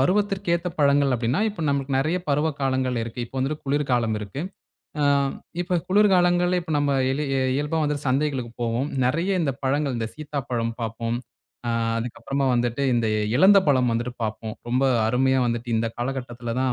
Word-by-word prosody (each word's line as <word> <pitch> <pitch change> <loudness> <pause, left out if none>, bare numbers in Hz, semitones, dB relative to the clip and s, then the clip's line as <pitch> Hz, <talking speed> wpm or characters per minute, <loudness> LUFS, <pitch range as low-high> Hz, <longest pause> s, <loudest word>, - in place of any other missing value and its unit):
பருவத்திற்கேத்த 185 +1 +1
பழங்கள் 140 -1 +4
அப்படின்னா 120 - 0
இப்ப 200 -6 -6
நம்முளுக்கு 140 -1 0
நெறைய 155 +6 +1
பருவ 150 +3 +2
காலங்கள் 130 -2 0
இருக்கு. 115 +2 -6
இப்ப 130 - -22
வந்துட்டு 145 +3 -2
குளிர் 145 +1 0
காலம் 115 -3 +1
இருக்கு. 105 +6 -6 0.6
ஆ - - +3 0.6
இப்ப 180 0 0
குளிர் 205 +2 +5
காலங்கள்ல 175 0 +3
இப்ப 160 - -5
நம்ம 145 0 +1 0.2
எளி 145 +3 -1
அ - - +1
இயல்பா 150 +3 -1
வந்துட்டு 145 -1 -2
சந்தைகளுக்குப் 130 -4 -1
போவோம். 120 +5 -1 0.2
நெறையா 165 +10 +1
இந்தப் 140 -5 -2
பழங்கள் 140 0 +1
இந்தச் 115 -1 -3
சீத்தாப்பழம் 130 -6 -3
பாப்போம். 115 +1 -2 0.5
அ - - +1 0.3
அதுக்கப்புறமா 135 +4 -2
வந்துட்டு, 120 +2 0
இந்த 115 -1 +1 0.3
எலந்தப்பழம் 155 -11 +5
வந்துட்டு 120 +2 -2
பாப்போம். 110 0 -4
ரொம்ப 130 +3 +2 0.2
அருமையா 130 +3 +2
வந்துட்டு 120 +1 -2
இந்தக் 115 0 -2
காலகட்டத்துலதான் 125 0 -2
135 Hz, 160 wpm, -24 LUFS, 120-150 Hz, 0.6 s, குளிர்